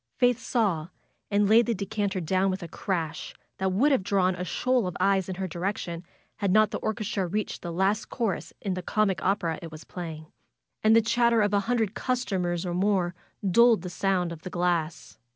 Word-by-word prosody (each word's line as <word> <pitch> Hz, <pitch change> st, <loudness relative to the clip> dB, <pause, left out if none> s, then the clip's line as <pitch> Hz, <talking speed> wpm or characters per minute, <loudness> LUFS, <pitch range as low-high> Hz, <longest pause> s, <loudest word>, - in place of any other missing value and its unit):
Faith 245 Hz, -2 st, +3 dB
saw, 190 Hz, -10 st, 0 dB, 0.4 s
and 205 Hz, 0 st, +3 dB
laid 225 Hz, +3 st, +5 dB
the 235 Hz, -, +1 dB
decanter 200 Hz, 0 st, -2 dB
down 185 Hz, +3 st, +1 dB
with 190 Hz, 0 st, -3 dB
a -, -, -5 dB
crash 165 Hz, -3 st, -3 dB, 0.2 s
that 190 Hz, 0 st, +1 dB
would 255 Hz, +11 st, +3 dB
have 270 Hz, -, +3 dB
drawn 185 Hz, -1 st, +2 dB
a 180 Hz, 0 st, -4 dB
shoal 250 Hz, +3 st, +1 dB
of 180 Hz, -, -5 dB
eyes 195 Hz, -2 st, +2 dB
in 185 Hz, -, -3 dB
her 190 Hz, +1 st, -3 dB
direction 175 Hz, -1 st, -3 dB, 0.3 s
had 200 Hz, -3 st, 0 dB
not 215 Hz, +1 st, +4 dB
the -, -, -3 dB
orchestra 205 Hz, -3 st, -2 dB
reached 210 Hz, +4 st, -3 dB
the 170 Hz, -, -5 dB
last 195 Hz, +5 st, 0 dB
chorus 225 Hz, -6 st, -2 dB
in 195 Hz, -, -2 dB
the 185 Hz, -, -3 dB
comic 195 Hz, 0 st, 0 dB
opera 180 Hz, -5 st, 0 dB
it 165 Hz, -, -8 dB
was 155 Hz, 0 st, -10 dB
playing. 160 Hz, -3 st, -7 dB, 0.6 s
And 220 Hz, +1 st, +6 dB
the 230 Hz, -, +5 dB
chatter 235 Hz, 0 st, +3 dB
of 205 Hz, 0 st, 0 dB
a 200 Hz, -, +4 dB
hundred 225 Hz, -5 st, +1 dB
customers 190 Hz, -9 st, -1 dB
or 175 Hz, -, -2 dB
more 185 Hz, -1 st, +1 dB, 0.3 s
dulled 235 Hz, +3 st, +5 dB
the 180 Hz, -, -5 dB
sound 180 Hz, -2 st, 0 dB
of 165 Hz, -2 st, -8 dB
the 185 Hz, -, -6 dB
glass. 175 Hz, -3 st, -2 dB
190 Hz, 200 wpm, -27 LUFS, 175-215 Hz, 0.6 s, And